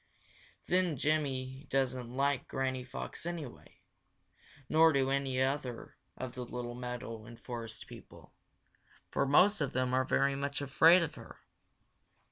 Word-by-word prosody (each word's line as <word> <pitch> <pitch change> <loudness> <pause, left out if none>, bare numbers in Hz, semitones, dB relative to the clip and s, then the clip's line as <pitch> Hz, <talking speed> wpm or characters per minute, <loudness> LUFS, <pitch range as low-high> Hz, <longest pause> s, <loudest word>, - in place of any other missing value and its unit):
Then 180 -4 +1
Jimmy 135 -2 -1
doesn't 130 -2 0
like 140 +2 0
Granny 130 -1 -2
Fox 125 - -7
anyway, 165 -7 -7 0.9
nor 160 +2 +6
do 135 -2 +2
any 135 -2 0
of 135 +3 +2
the 130 - -5
other 120 - -9 0.6
little 120 -1 -4
meadow 125 -2 -6
and 115 0 -12
forest 115 -3 -6
people, - - -14 0.8
for 140 - +1
most 180 +7 +5
of 140 - -1
them 130 0 0
are 130 0 +3
very 140 +1 +2
much 140 0 -2
afraid 160 +5 +6
of 165 - -4
her. - - -12
135 Hz, 135 wpm, -32 LUFS, 125-145 Hz, 0.9 s, nor